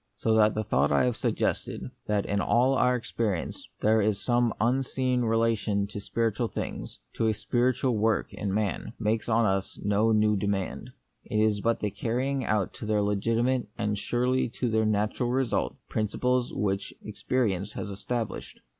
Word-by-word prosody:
So 110 - +1
that 110 -1 +4
the 110 - 0
thought - - +1
I - - +4
have 125 -2 +1
suggested, - - -2 0.2
that 105 -1 +1
in 100 0 0
all 125 +6 +3
our 125 -1 +3
experience 115 -6 -3
there 110 +1 +4
is 105 -1 +1
some 120 -1 +2
unseen 130 +1 +1
re 115 -1 +2
lation 110 -3 +1
to 105 - -6
spiritual 115 +2 0
things - - -5
— - - -45
to 115 - +2
a 110 - +2
spiritual 125 +2 +1
work 110 -1 +1
in 100 - -3
man 105 +1 -2
— - - -38
makes 110 +1 -1
on 115 0 +3
us 95 -1 -1
no 105 +2 +2
new 105 -1 +3
demand. 100 -1 -2 0.4
It - - -3
is 110 -1 +2
but 115 +2 +1
the 105 - -1
carrying 130 +6 -1
out 105 -4 0
to 110 - -6
their 105 -1 +2
legitimate, 115 +5 +1
and 105 -3 0
surely 125 +5 0
to 125 0 -2
their 110 0 +2
natural 110 +3 0
result, 130 -1 0
principles 125 +3 0
which 100 -1 -2
experience 105 -2 -1
has 105 - -5
established. 105 +3 -4
110 Hz, 175 wpm, -28 LUFS, 105-120 Hz, 0.4 s, that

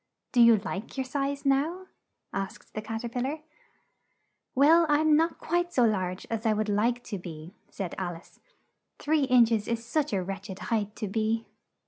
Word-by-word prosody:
"Do 245 - +4
you 230 -1 +8
like 195 +5 -6
your 265 - 0
size 280 +1 -2
now?" 305 +7 +1 0.5
asked 195 -1 -5
the 215 - -4
Cat 225 +1 -5
er 235 - -3
pil 245 +1 -3
lar. 280 +5 -2 1.2
"Well, 320 +5 +6
I'm 300 +1 +4
not 325 +2 +2
quite 350 +1 -1
so 255 -7 +3
large 185 -4 -1
as 225 -1 -3
I 220 -2 +3
would 215 0 -1
like 235 +4 +1
to 200 - -5
be," 165 0 -9 0.2
said 190 -4 -5
Al 175 -2 -3
ice; 165 - -16 0.6
"three 300 -1 +1
inch 245 -3 +5
es 215 -2 0
is 235 0 -2
such 300 +4 0
a 190 -3 0
wretch 195 +1 -6
ed 190 - -6 0.2
height 210 -1 -1
to 210 - -4
be." 220 +2 -1
230 Hz, 190 wpm, -28 LUFS, 205-280 Hz, 1.2 s, you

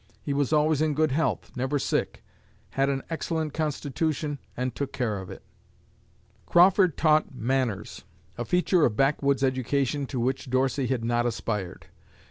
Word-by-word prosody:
He 145 - -2
was 140 -1 0
always 155 -1 +3
in 155 -2 +1
good 155 -1 +2
health, 160 +4 -1
never 130 +3 -1
sick, - - -2 0.5
had 135 +1 +1
an 135 -1 -1
excellent 160 -1 -2
constitution 150 -1 -2 0.2
and 125 0 -2
took 140 +2 -4
care 110 -6 -2
of 95 - -9
it." - - -10 1.0
Crawford 180 -1 +5
taught 155 -3 +2
"manners" 125 -4 -2 0.3
a 120 - -3
feature 180 - +2
of 110 - +2
backwoods 140 0 +2
education 135 +1 0
to 130 - -4
which 130 +2 -1
Dorsey 130 +1 +1
had 120 -3 -1
not 120 +1 +1
aspired. 105 -5 -4
135 Hz, 150 wpm, -26 LUFS, 125-155 Hz, 1.0 s, Crawford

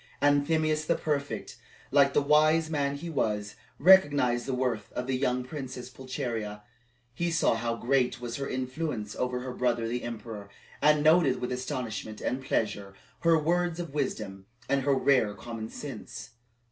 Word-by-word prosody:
Anthemius 155 +2 +2
the 170 - +3
prefect, 145 -2 -3 0.3
like 140 0 +5
the 145 - +3
wise 155 +2 +4
man 140 -2 0
he 155 +5 -7
was, 105 -9 -1 0.2
recognized 145 -9 +5
the 135 - -1
worth 125 -5 -2
of 125 - -3
the 130 0 -1
young 125 -1 0
Princess 130 -2 -7
Pulcheria; 115 -5 -4 0.5
he 170 +7 -1
saw 165 -6 +3
how 115 +1 -1
great 125 +1 +1
was 120 -1 -5
her 140 0 -3
influence 130 -4 -3
over 125 0 -2
her 125 0 -5
brother 120 -2 0
the 120 +2 -2
emperor, 110 -3 -7 0.3
and 150 0 +4
noted 155 -4 +5
with 125 - -3
astonishment 120 -4 -4
and 130 +2 -2
pleasure 100 -5 -2 0.2
her 165 -1 +4
words 175 +2 0
of 170 -5 -5
wisdom 100 -9 -3 0.2
and 140 0 +2
her 140 +1 +2
rare 130 -6 +3
common 110 +1 -6
sense. 110 -5 -8
130 Hz, 160 wpm, -29 LUFS, 115-150 Hz, 0.5 s, like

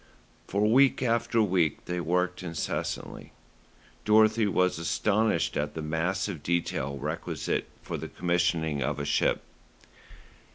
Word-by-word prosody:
For 100 +2 0
week 130 +4 +4
after 115 -1 +2
week 90 -6 +1
they 90 0 -3
worked 90 +2 0
incessantly. 85 -2 -4 0.7
Dorothy 110 +1 +4
was 90 -3 +1
astonished 100 +3 +1
at - - -2
the 80 - -4
mass 80 +6 -1
of 90 -8 -5
detail 70 -5 -1
requisite 75 +4 -3 0.2
for - - -4
the - - -6
commissioning 85 -4 0
of 65 - -1
a - - -3
ship. - - +1
90 Hz, 125 wpm, -28 LUFS, 80-105 Hz, 0.7 s, week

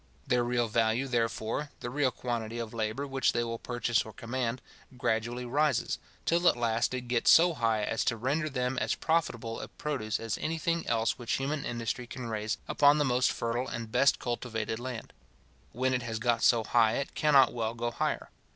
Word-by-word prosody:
Their 125 -3 +2
real 120 -1 +1
value, 115 +3 +1
therefore, 115 +3 -1
the 120 - -4
real 140 0 +2
quantity 120 -2 -4
of 115 -1 -5
labour 110 +4 -2
which 135 -2 +1
they 120 - +1
will 115 -1 -4
purchase 120 -1 0
or 110 - -10
command, 120 +2 -3 0.4
gradually 120 +1 -1
rises, 145 +2 +1 0.3
till 175 +1 +3
at - - +5
last 115 +1 +1
it 130 - -2
gets 120 -1 +1
so 170 +1 +7
high 115 -6 +1
as 110 - 0
to 115 - +1
render 145 +7 0
them 125 -1 -1
as - - 0
profitable 120 -9 -1
a - - -6
produce 115 -8 -3
as 115 -1 -3
any 165 +1 -2
thing 170 0 -1
else 115 +1 +1
which 120 -1 -2
human 140 +2 -1
industry 120 +1 -3
can 125 0 -7
raise 110 -1 -2
upon 145 0 +5
the 145 - +2
most 125 0 +2
fertile 120 +2 -2
and 115 -3 -5
best 140 +3 +4
cultivated 115 -2 -3
land. 125 -2 -6 0.6
When 130 +1 0
it 125 - +1
has 115 -2 -3
got 115 0 +1
so 115 -2 +4
high, 115 -1 +3
it 140 +3 -3
cannot 140 -4 +5
well 115 -1 -2
go 120 0 -2
higher. - - -2
120 Hz, 195 wpm, -30 LUFS, 115-130 Hz, 0.6 s, so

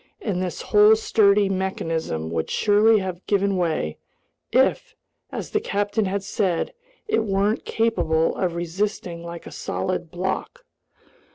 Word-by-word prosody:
And 190 -5 -2
this 180 -3 -4
whole 210 +1 +6
sturdy 205 -2 +3
mechanism 165 - -2
would 80 -1 -2
surely 215 +1 +4
have 185 -1 -5
given 200 -1 +2
way, 160 - -1 0.5
if, - - +2 0.4
as - - -6
its - - 0
captain 205 +2 0
had 195 +1 -2
said, 190 -3 -1 0.3
it 430 - +1
weren't 200 +1 0
capable 165 -8 +1
of 175 -3 -1
resisting 175 0 -3
like 170 0 -8
a - - -9
solid 180 -2 -3
block. 190 - -4
190 Hz, 130 wpm, -23 LUFS, 170-205 Hz, 0.5 s, whole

